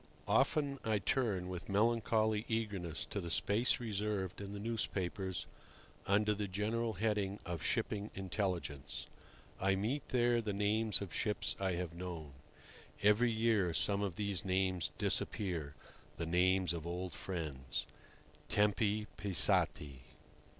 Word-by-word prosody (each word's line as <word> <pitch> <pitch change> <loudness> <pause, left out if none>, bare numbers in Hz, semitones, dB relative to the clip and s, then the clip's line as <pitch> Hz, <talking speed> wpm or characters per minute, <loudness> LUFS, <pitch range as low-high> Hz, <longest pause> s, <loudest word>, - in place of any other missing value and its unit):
XVI. - - -20
Often 140 -3 +3
I 110 -1 +2
turn 100 -3 0
with 90 0 -6
melancholy 110 0 +2
eagerness 105 -7 -2
to - - -4
the 85 - -5
space 105 +8 +2
reserved 105 -4 -2
in 100 0 -6
the 100 - -5
newspapers 95 -4 -2 0.6
under 105 +2 +3
the 105 0 -2
general 110 +4 -1
heading 105 -1 0
of 85 -3 -4
"Shipping 105 0 0
Intelligence." 90 -7 -3 0.5
I 95 0 +3
meet 115 +9 -2
there 120 -1 +3
the 105 -2 -2
names 105 +2 +2
of 90 - -8
ships 105 -1 0
I 95 -1 +1
have 85 -1 -3
known. 85 -4 -6 0.7
Every 105 +4 +5
year 110 -6 +2
some 100 0 +2
of 100 -4 -1
these 100 -4 -1
names 95 -2 +1
disappear—the 85 -3 -2
names 90 +1 +3
of 85 -1 -5
old 90 +1 -3
friends. 80 -9 -3 0.6
"Tempi 105 0 +2
passati!" 75 -7 +2
100 Hz, 130 wpm, -36 LUFS, 90-110 Hz, 0.7 s, Every